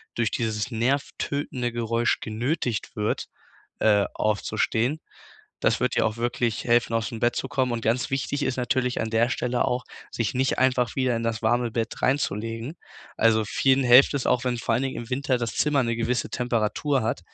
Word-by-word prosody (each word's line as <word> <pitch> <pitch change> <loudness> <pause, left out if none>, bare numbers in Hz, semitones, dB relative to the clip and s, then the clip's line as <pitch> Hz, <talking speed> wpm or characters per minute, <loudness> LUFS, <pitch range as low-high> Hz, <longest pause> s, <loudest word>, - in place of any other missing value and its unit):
durch 120 -2 0
dieses 110 +1 -2
nervtötende 130 +1 -1
Geräusch 115 0 0
genötigt 120 +2 -2
wird, 105 -1 -1 0.5
äh, 105 -2 +4
aufzustehen. 110 +6 0 0.6
Das - - +3
wird - - 0
dir - - +3
auch 110 0 -2
wirklich 120 -1 -1
helfen, 120 -1 +2
ausm 115 0 -2
Bett 120 0 +1
zu - - -2
kommen 130 -3 0
und 115 -1 -3
ganz 115 +3 +1
wichtig 135 +2 -2
ist 130 - -1
natürlich 125 0 0
an 110 - -3
der 115 +1 +2
Stelle 125 -1 0
auch, 125 +1 -1 0.3
sich 115 -4 -2
nicht 130 +1 0
einfach 125 -2 +2
wieder 130 -2 +1
in 115 - -3
das 115 -1 -2
warme 120 +1 +1
Bett 115 -1 -3
reinzulegen. 115 - -1 0.4
Also 110 -1 +4
vielen 135 +5 +2
helft 125 +4 +7
es 140 - -1
auch, 125 - +1
wenn 125 -1 0
vor 115 0 -2
allen 120 +4 +1
Dingen 135 - -3
im 115 +1 -7
Winter 130 0 0
das 115 -3 -3
Zimmer 145 -2 +2
'ne 115 -1 -1
gewisse 120 +2 -1
Temperatur 125 +3 0
hat, 110 -3 -1
120 Hz, 185 wpm, -25 LUFS, 115-130 Hz, 0.6 s, helft